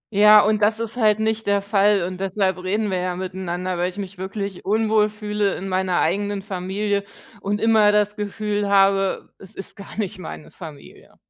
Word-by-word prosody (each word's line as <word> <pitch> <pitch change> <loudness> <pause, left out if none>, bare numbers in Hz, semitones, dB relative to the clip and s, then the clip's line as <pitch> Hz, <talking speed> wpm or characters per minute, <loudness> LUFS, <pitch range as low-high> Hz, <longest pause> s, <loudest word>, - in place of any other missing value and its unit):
Ja, 210 +1 +8
und 215 0 +1
das 215 +2 +3
ist 230 0 -4
halt 215 -3 +3
nicht 220 0 -1
der 200 0 +3
Fall 200 -2 +3
und 185 +1 -5
deshalb 190 -1 -1
reden 205 +2 -1
wir 185 - 0
ja 180 0 -2
miteinander, 185 -1 -4
weil 180 +1 +1
ich 185 - -12
mich 195 -2 -7
wirklich 195 0 -5
unwohl 215 +1 +2
fühle 210 -1 -2
in 195 - -6
meiner 185 -1 0
eigenen 200 +3 -1
Familie 200 +1 -2 0.4
und 205 +1 -1
immer 220 -2 +4
das 210 0 +1
Gefühl 210 -1 -2
habe, 195 -1 +2
es 190 - -11
ist 195 - -6
gar 200 - -10
nicht 200 -4 -3
meine 160 -3 -9
Familie. 155 -5 -12
200 Hz, 185 wpm, -22 LUFS, 185-210 Hz, 0.4 s, Ja